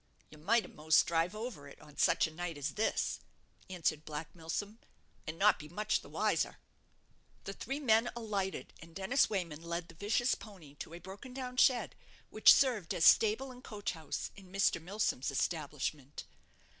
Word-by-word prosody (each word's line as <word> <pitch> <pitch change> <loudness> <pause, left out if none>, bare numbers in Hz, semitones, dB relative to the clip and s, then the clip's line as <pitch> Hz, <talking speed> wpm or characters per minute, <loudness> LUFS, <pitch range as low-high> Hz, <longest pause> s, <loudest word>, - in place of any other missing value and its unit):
"You 155 - -13
might 220 +8 +2
a'most 155 +1 +3
drive 170 +4 0
over 215 - -6
it 140 - -14
on 150 - -16
such - - +3
a 160 - -5
night 170 -1 -4
as 145 +1 -3
this," 220 - 0 0.5
answered 165 -4 -1
Black 150 0 -6
Milsom, 200 +6 -5 0.5
"and 155 +1 -4
not 210 +3 +4
be 150 - -9
much 210 +5 0
the - - -14
wiser." - - 0 0.9
The 195 - -5
three 270 +8 -4
men 235 -3 +3
alighted, 205 -5 -3
and 165 0 -14
Dennis 195 +8 +2
Wayman 170 -7 -3
led 170 +1 -4
the - - -12
vicious 210 +8 +1
pony 185 -10 -10
to 165 - -8
a - - -8
broken 200 +9 -10
down 250 -1 -5
shed, 250 -1 +4 0.4
which - - +8
served 235 -11 +3
as 165 - +2
stable 225 +5 +5
and 250 0 -13
coach 205 -3 -4
house 160 -4 -5
in 190 -2 -14
Mr. 195 -3 +2
Milsom's 185 -7 -1
establishment. 145 -1 -3
185 Hz, 170 wpm, -33 LUFS, 160-220 Hz, 0.9 s, which